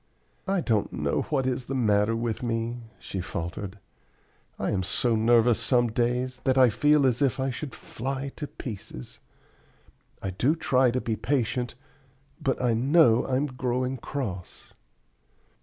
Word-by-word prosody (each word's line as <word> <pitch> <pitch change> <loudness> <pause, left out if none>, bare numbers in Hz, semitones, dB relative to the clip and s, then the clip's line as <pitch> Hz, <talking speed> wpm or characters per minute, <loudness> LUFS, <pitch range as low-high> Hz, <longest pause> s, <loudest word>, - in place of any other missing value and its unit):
"I 195 -1 +1
don't 110 -8 0
know - - -1
what 135 -4 +1
is 130 -1 -1
the 135 - -3
matter 105 -2 +2
with 115 -1 -2
me," 115 0 -2 0.2
she 95 - -5
faltered. 90 +3 -5 0.8
"I - - -1
am 100 -3 0
so 115 +5 +1
nervous 115 +1 +4
some 120 -3 +2
days 125 +2 0
that 130 0 +2
I 130 -3 +6
feel 150 +4 +4
as 125 0 +2
if 135 -2 +2
I 135 0 0
should 135 +1 -6
fly 135 +3 -4
to 150 - -4
pieces. 110 - -8 1.0
I 95 - -3
do 125 - +2
try 130 -5 +3
to 125 +2 0
be 115 - -1
patient, 125 0 -1 0.7
but 135 - 0
I 125 -2 +2
know 125 0 +4
I'm 130 +2 +1
growing 130 -1 -2
cross!" 110 -9 -6
125 Hz, 150 wpm, -27 LUFS, 115-135 Hz, 1.0 s, I